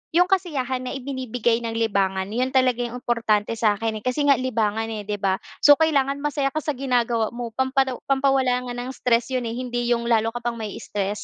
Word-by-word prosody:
yung 355 - +7
kasiyahan 270 -9 -1
na - - -4
ibinibigay 250 -3 -1
ng 230 -1 -4
libangan. 195 -3 0
Yun 255 +4 -1
talaga 255 -2 +3
yung 240 0 -3
importante 225 -4 +1
sa'kin, 220 0 +1
eh. - - -22
Kasi 255 +4 0
nga 275 -4 +5
libangan, 225 -3 0
eh, 220 -2 -5
'di 205 0 -4
ba? 195 -1 +1 0.2
So, 290 - +8
kailangan 280 -3 +2
masaya 290 -2 0
ka 310 - -1
sa 300 - 0
ginagawa 240 -4 +1
mo 240 -1 -5
pampalo 260 0 +1
pampawala 265 -2 +2
nga - - -4
ng 245 +1 -5
stress 235 -1 +1
yun, 255 -1 0
eh, - - -3
hindi 245 -1 -3
yung 235 -1 +1
lalo 225 -1 +2
ka - - -2
pang 240 0 -1
mai-stress. 205 -1 -4
245 Hz, 205 wpm, -23 LUFS, 225-265 Hz, 0.2 s, So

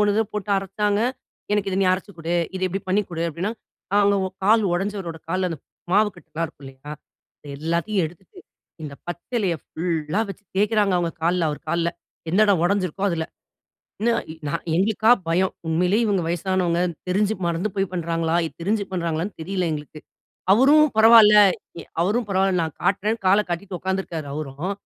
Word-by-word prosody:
ஒண்ணு 205 -1 +3
இத 220 - +3
போட்டு 210 0 -3
அரைச்சாங்க. 205 +2 -1 0.5
எனக்கு 205 -1 +1
இத 185 - -1
நீ - - +3
அரைச்சு 195 +2 -4
குடு. 165 +1 -2 0.2
இத 190 - -4
இப்டி 195 +2 -3
பண்ணி 190 +3 +3
குடு. 165 -1 -3
அப்டின்னா, 175 +7 -3 0.4
காலோ 200 0 +4 0.3
கால் 220 +2 +5
உடைஞ்சவரோட 190 -3 -3
கால்ல, 185 +1 0
அந்த 160 - -5 0.3
மாவு 210 +2 +5
கட்டலாம் 160 +1 -5
இருக்கும் 145 -2 -16
இல்லிங்களா, 135 +2 -10 0.5
இது 145 - -9
எல்லாத்தையும் 170 +6 0
எடுத்துட்டு, 175 +3 -15 0.4
இந்த 145 -2 -6
பச்சிலைய 180 +2 -2
ஃபுல்லா 165 +2 -2
வச்சு 205 - -10
தேய்க்கிறாங்க, 210 0 +2
அவங்க 170 -1 -1
கால்ல, 170 -1 +2
அவர் 150 - -6
கால்ல 170 0 +1 0.4
எந்த 185 +5 +3
இடம் 190 -5 +3
ஒடஞ்சிருக்கோ, 195 -1 -1
அதில. 160 -1 -1 0.8
என்ன 235 +2 +2 0.4
நா - - -3 0.2
எங்களுக்கா 215 +4 +2 0.2
பயம். 185 +3 +2 0.2
உண்மையிலேயே 180 +7 +2
இவங்க 195 -4 +1
வயசானவங்க. 175 0 0 0.3
தெரிஞ்சு 205 +3 +1
மறந்து 170 +4 0
போய் 195 -1 0
பண்றாங்களா? 165 -1 -1
இது - - -9
தெரிஞ்சு 205 +2 0
பண்றாங்களான்னு 170 +1 -2
தெரியல 185 +2 -2
எங்களுக்கு. 150 0 -7 0.5
அவரும் 285 +8 +6
பரவால்ல, 220 -1 +8 0.5
எ - - -8 0.2
அவரும் 215 +6 0
பரவால்ல 190 0 +2
நான் 160 -2 -4
காட்டுறேன்னு, 210 +3 +1
காலை 195 +3 +5
கட்டிட்டு 180 +1 -4
உக்காந்துருக்காரு 185 -5 -3
அவரும். 155 +5 -4
185 Hz, 160 wpm, -23 LUFS, 165-205 Hz, 0.8 s, பரவால்ல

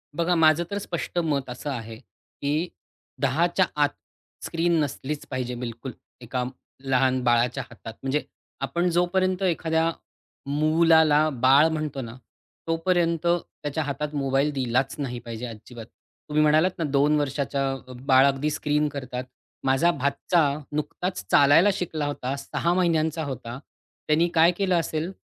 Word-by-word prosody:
बघा 170 +1 +1
माझं 160 0 +4
तर 200 - -1
स्पष्ट 180 -3 -3
मत 145 -6 -1
असं 125 +4 -6
आहे, 115 -3 -6
की 150 +8 -4 0.5
10 145 +5 +2
च्या 180 +1 +2 0.2
आत 145 - +3 0.6
स्क्रीन 170 0 +1
नसलीच 145 +1 -4
पाहिजे 125 -2 -3
बिलकुल 120 +1 -6 0.3
एका 125 +1 -3 0.4
लहान 130 -1 +2
बाळाच्या 120 +2 +2
हातात 115 -2 -10
म्हणजे 135 +3 0 0.4
आपण 170 +6 0
जोपर्यंत 180 +2 +1
एखाद्या 165 -2 +1 0.6
मुलाला 155 0 +4
बाळ 135 +3 +5
म्हणतो 155 -3 -3
ना, 115 0 -8 0.5
तोपर्यंत 165 0 +1
त्याच्या 160 -3 -2
हातात 145 +1 -4
मोबाईल 135 +1 +1
दिलाच 130 0 0
नाही 125 -4 -3
पाहिजे 115 0 -7
अजिबात. 115 0 -10 0.4
तुम्ही 150 +1 +2
म्हणालात 155 +4 +4
ना, 170 - -2
2 145 +1 +2
वर्षाच्या 135 -2 -2
बाळ 130 0 +6
अगदी 140 +2 0
स्क्रीन 150 0 0
करतात. 130 -3 -5 0.4
माझा 135 +6 +3
भाचा 140 +4 +1 0.3
नुकताच 150 - -3
चालायला 150 +8 +6
शिकला 165 -6 -3
होता, 140 -2 -3
6 170 +5 -1
महिन्यांचा 160 -3 +1
होता. 125 -3 -6 0.5
त्यानी 160 +3 +3
काय 165 +1 +5
केलं 190 -3 +1
असेल 160 +2 -3
145 Hz, 135 wpm, -25 LUFS, 130-165 Hz, 0.6 s, बाळ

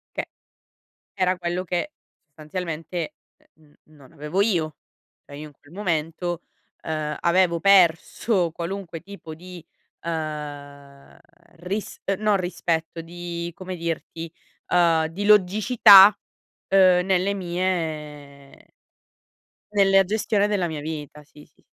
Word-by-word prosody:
Che - - -3 0.9
era 185 -1 +1
quello 175 +1 -3
che 180 - -3 0.3
sostanzialmente, 160 +2 -6 0.4
ehm, 155 -2 -25
n 155 - -22
non 135 -3 -18
avevo 150 +6 -3
io. 165 -8 0 0.5
Cioè 145 - -11
io, 155 +1 -8
in - - -18
quel 145 - -21
momento, 175 -2 -3 0.4
ehm, 155 -1 -3
avevo 170 -1 +2
perso 185 0 +3
qualunque 170 0 -6
tipo 175 -3 -10
di, 175 +1 -12 0.4
ehm, 145 -3 -7 0.4
ris 195 +4 -5 0.2
no 210 -1 +2
rispetto, 170 -3 -2
di 170 0 -6
come 185 0 -7
dirti, 165 -1 -5 0.4
ehm, 165 -3 +3
di 185 +6 -5
logicità, 210 0 +7 0.5
ehm, 185 -2 +4
nelle 190 +1 +1
mie 155 -6 -5 1.0
Nella 195 -1 +5
gestione 205 +1 0
della 200 -4 0
mia 160 -3 -5
vita. 150 -1 -7
Sì, 150 0 -17
sì. - - -31
170 Hz, 115 wpm, -23 LUFS, 155-190 Hz, 1.0 s, logicità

